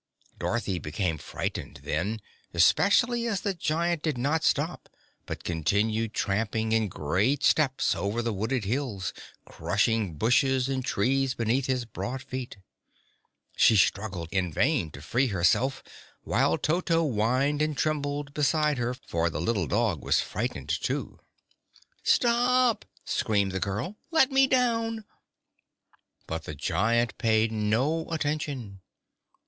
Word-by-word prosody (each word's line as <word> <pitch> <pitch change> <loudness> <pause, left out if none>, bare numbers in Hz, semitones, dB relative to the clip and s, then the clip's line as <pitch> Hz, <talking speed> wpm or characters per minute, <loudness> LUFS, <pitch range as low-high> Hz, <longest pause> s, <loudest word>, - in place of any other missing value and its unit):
Dorothy 105 -6 -1
became 80 +1 -2
frightened, - - -5
then, 100 +8 -2 0.3
especially 235 - +4
as 205 -4 -1
the 200 - -1
giant 170 -1 -1
did 155 -5 -1
not 150 +6 0
stop 160 +4 0 0.4
but - - -6
continued 105 +7 0
tramping 110 +2 -1
in 110 -1 +2
great 95 - 0
steps 135 -4 +3
over 105 +4 -2
the 115 -1 -1
wooded 110 +3 -1
hills, 115 -4 -2 0.3
crushing 110 -7 0
bushes 130 - +2
and 135 -1 -2
trees 130 +4 +1
beneath 120 +3 0
his 130 -2 0
broad 125 +4 -5
feet. 130 -5 -6 1.0
She 115 - +5
struggled 95 -4 +1
in 90 -3 0
vain 120 - +1
to 70 -1 -11
free 130 - +1
herself, 115 +7 +1 0.4
while - - +2
Toto 165 0 +1
whined 130 +5 +1
and 155 -2 0
trembled 145 -1 -1
beside 150 -1 +1
her, 120 +1 -1
for 85 -9 -2
the 80 - -4
little 95 -1 0
dog 105 - 0
was - - +2
frightened, 65 - -3
too. - - -2 0.8
"Stop!" 245 0 +3 0.2
screamed 100 -3 0
the 95 - -2
girl. 105 - -3
"Let 320 -5 +4
me 270 0 +5
down!" 230 -4 +1 1.2
But 80 -1 -5
the 75 - -6
giant 115 - 0
paid 110 0 +2
no 115 +10 0
attention. 145 -10 -3
120 Hz, 130 wpm, -27 LUFS, 100-150 Hz, 1.2 s, She